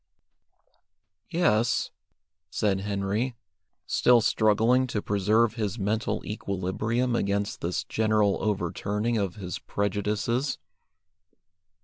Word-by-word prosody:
"Yes," 120 -10 +2 0.6
said 95 +1 0
Henry, 100 +5 -2 0.5
still 120 -1 +4
struggling 115 +4 +3
to 115 - -2
preserve 105 +3 +2
his 105 -2 -3
mental 110 +2 -1
equilibrium 105 +5 -1
against 100 -2 -1
this 85 +1 -1
general 110 -2 +1
overturning 105 +3 -1
of 95 -4 -2
his 90 -4 -5
prejudices. 105 +6 -1
105 Hz, 85 wpm, -27 LUFS, 100-115 Hz, 0.6 s, still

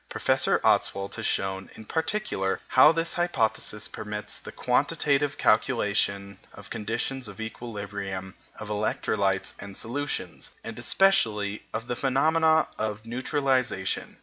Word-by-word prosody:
Professor - - +2
Ostwald 100 0 +2
has - - -2
shown, 95 0 -1
in 110 - -11
particular, 160 - -1
how 130 +4 +8
this 165 +1 0
hypothesis 110 -10 0
permits 105 0 -6
the - - -9
quantitative 145 0 +1
calculation 100 -4 +1 0.2
of - - -11
the - - -12
conditions 120 +4 -2
of 105 +1 -10
equilibrium 100 -4 -5 0.2
of 110 - -8
electrolytes 100 -2 0
and 100 -1 -8
solutions, 145 +5 -4
and 115 0 -7
especially 110 - +2
of 110 +1 -4
the 120 - -2
phenomena 160 +5 +3
of 110 0 -3
neutralization. 130 -4 0
110 Hz, 120 wpm, -27 LUFS, 100-135 Hz, 0.2 s, how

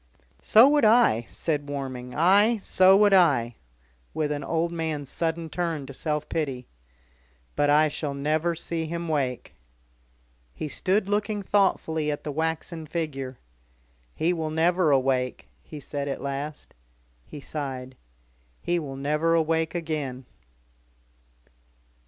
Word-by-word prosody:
"So 225 +4 +7
would 290 0 +3
I," 215 - +4
said 145 -3 -3
Warming. 130 -3 -5
"Aye! 205 +8 +4
so 185 +1 +5
would 205 -1 +5
I," 140 -11 +4 0.6
with 155 -2 -1
an 145 -1 -3
old 165 +3 -1
man's 160 -4 -3
sudden 165 0 -2
turn 165 -3 -3
to 140 - -9
self 150 +2 -2
pity. 135 -6 -3 0.9
"But 145 0 +2
I 150 +1 +5
shall 145 -1 -4
never 155 +4 0
see 165 0 -3
him 170 +1 -4
wake." 135 -5 -2 1.0
He - - -4
stood 190 +7 0
looking 205 0 -1
thoughtfully 160 -6 +1
at 145 - -3
the 150 - -4
waxen 160 +1 -3
figure. 135 -6 -4 0.8
"He 170 +3 +1
will 160 -2 -3
never 165 +2 +2
awake," 130 -2 0
he 150 - -10
said 145 0 -5
at 140 - -3
last. 140 +2 -5 0.5
He - - -9
sighed. 135 -3 -6 0.6
"He 175 0 -1
will 140 -4 -6
never 150 +4 +1
awake 160 0 0
again." 150 -6 -4
155 Hz, 130 wpm, -26 LUFS, 140-170 Hz, 1.0 s, So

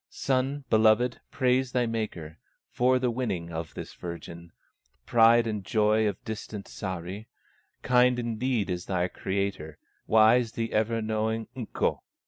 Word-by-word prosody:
"Son 135 +2 -1
beloved, 110 +2 +4
praise 130 -1 +1
thy 125 -1 +2
Maker, 105 -9 -4 0.3
For 130 +1 +3
the 125 -1 0
winning 95 -9 -3
of 80 -1 -6
this - - -7
virgin, 85 0 -8 0.5
Pride 115 0 +5
and 105 -3 -3
joy 110 +1 +2
of 105 - -4
distant 110 -2 -6
Sahri! 95 +3 -6 0.6
Kind 125 0 +4
indeed 120 -1 -1
is 90 0 -4
thy 90 -2 0
Creator, 95 -5 -3 0.3
Wise 110 +2 +4
the 115 0 -3
ever 110 +1 +1
knowing 110 +1 -1
Ukko! 120 -4 -2
110 Hz, 130 wpm, -27 LUFS, 95-120 Hz, 0.6 s, Pride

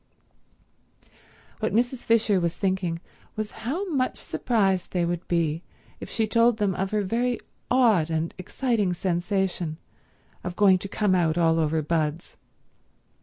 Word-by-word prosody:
What - - -1
Mrs. 245 +2 +1
Fisher 225 -4 +2
was 170 -1 -1
thinking 185 -4 -1 0.3
was 215 0 -3 0.2
how 365 +8 -2
much 260 -4 0
surprised 195 -6 0
they 175 -2 +1
would 175 0 -3
be 165 -2 0 0.4
if - - -8
she 225 - 0
told 230 +1 +3
them 205 -3 +1
of 190 +1 -2
her 210 0 0
very 240 +5 0 0.3
odd 225 -11 +4
and 160 0 -1
exciting 210 -2 0
sensation 175 -2 -1 0.7
of 180 -1 -4
going 190 -2 +5
to 200 - -5
come 205 -1 +1
out 170 -3 +2
all 165 -1 +3
over 155 0 +1
buds. 160 +1 -2
190 Hz, 140 wpm, -26 LUFS, 170-220 Hz, 0.7 s, going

